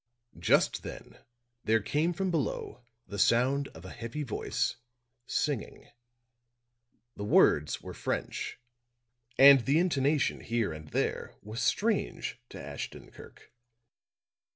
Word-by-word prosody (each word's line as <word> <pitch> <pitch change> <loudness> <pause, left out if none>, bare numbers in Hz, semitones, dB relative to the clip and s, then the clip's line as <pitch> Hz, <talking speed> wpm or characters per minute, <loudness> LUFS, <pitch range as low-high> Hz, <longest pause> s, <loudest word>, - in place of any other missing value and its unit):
Just - - +3
then - - -10 0.4
there 110 +1 +3
came 150 - 0
from 185 +2 -1
below 145 -5 -2 0.2
the 100 - -7
sound 130 +7 +3
of 80 +3 -13
a 95 - -8
heavy 120 +6 -5
voice, 120 -1 -2 0.5
singing. 145 -7 -2 1.3
The 100 - -6
words 75 -7 +3
were - - -7
French - - -3 0.8
and 140 0 +9
the 140 +5 +2
intonation 150 -4 +2
here 115 -7 -1
and 75 0 -9
there - - -2
was 110 +3 -5
strange 195 - 0
to - - -9
Ashton 70 +1 -7
Kirk. - - -15
130 Hz, 115 wpm, -30 LUFS, 105-150 Hz, 1.3 s, and